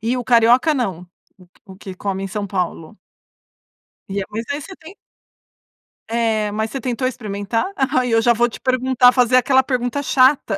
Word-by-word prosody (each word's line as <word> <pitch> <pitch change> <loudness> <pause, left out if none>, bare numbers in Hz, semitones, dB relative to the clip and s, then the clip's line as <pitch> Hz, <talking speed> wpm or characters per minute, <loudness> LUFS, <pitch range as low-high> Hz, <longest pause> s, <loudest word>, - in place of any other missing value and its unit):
E 230 +4 -1
o 250 - -3
carioca 245 +5 +4
não? 230 - -2 0.4
O 185 - -19
que - - -31
o 190 -1 -13
que 195 -2 -9
come 195 -1 -4
em 195 - -4
São 205 +1 -4
Paulo. 180 0 -4 1.1
E 200 +1 -3
é - - -3
mas 220 +2 -4
aí 285 +1 -2
você 380 +6 -10
tem 355 +6 -14 1.1
É. 225 -2 0
Mas 220 +1 -2
você 270 - -5
tentou 255 -1 -2
experimentar? 215 -2 -3
Aí, 255 -2 0
eu 225 0 +3
já 240 +1 +4
vou 240 +1 +1
te - - -11
perguntar, 255 -1 +3
fazer 250 -1 +3
aquela 260 +1 +4
pergunta 255 +1 -2
chata 260 -6 +2
235 Hz, 185 wpm, -19 LUFS, 210-255 Hz, 1.1 s, carioca